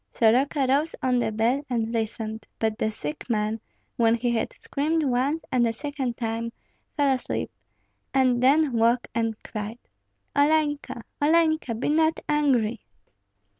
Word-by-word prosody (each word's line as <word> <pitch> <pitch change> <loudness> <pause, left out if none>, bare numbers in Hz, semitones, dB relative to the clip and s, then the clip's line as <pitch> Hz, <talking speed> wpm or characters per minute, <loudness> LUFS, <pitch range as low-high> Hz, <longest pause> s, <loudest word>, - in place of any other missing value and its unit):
Soroka 265 +5 +3
rose 285 +5 +1
on 250 -1 +2
the 235 - 0
bed 235 +6 +1
and 230 -2 -1
listened; 220 -1 -3
but 220 -1 0
the 220 - +1
sick 150 - -6
man, 215 0 0 0.4
when 230 -1 +4
he 240 +1 0
had 230 -1 -1
screamed 315 +3 -1
once 275 +4 0
and 240 -2 +3
a - - +1
second 275 -2 -4
time, 230 0 -3 0.5
fell 285 -2 +3
asleep, 255 - -3 0.6
and 255 -2 +3
then 280 +2 +4
woke 235 +1 +2
and 225 -1 0
cried, 215 +2 -5 0.6
"Olenka, 290 -4 +1 0.2
Olenka, 315 -5 +2
be 230 - -2
not 315 +1 +2
angry!" 250 -7 +1
245 Hz, 140 wpm, -25 LUFS, 225-285 Hz, 0.6 s, when